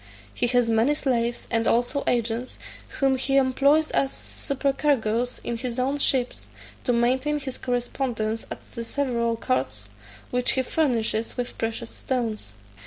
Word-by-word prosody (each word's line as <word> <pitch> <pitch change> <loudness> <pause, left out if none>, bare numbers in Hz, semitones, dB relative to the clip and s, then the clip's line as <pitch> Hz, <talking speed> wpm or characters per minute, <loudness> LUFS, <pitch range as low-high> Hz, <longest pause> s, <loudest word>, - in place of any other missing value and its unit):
He 240 - +1
has 245 -1 +3
many 230 +6 +3
slaves, 240 -4 0
and 230 -1 +2
also 245 +4 +2
agents, 235 +1 0 0.4
whom 270 -1 +3
he 270 +1 +2
employs 280 +4 +4
as 270 -1 +2
supercargoes 265 -4 0
in 235 - -2
his 240 0 -3
own 270 +3 0
ships, 255 -3 0 0.4
to 250 - +3
maintain 260 +5 +2
his 265 -2 -4
correspondence 240 -3 -2
at - - -6
the 235 - -5
several 235 -2 0
courts, 115 - -2 0.4
which 250 0 +2
he 260 - +2
furnishes 230 -6 0
with 245 0 -3
precious 225 +1 -3
stones. 225 - -3
245 Hz, 140 wpm, -25 LUFS, 230-270 Hz, 0.4 s, employs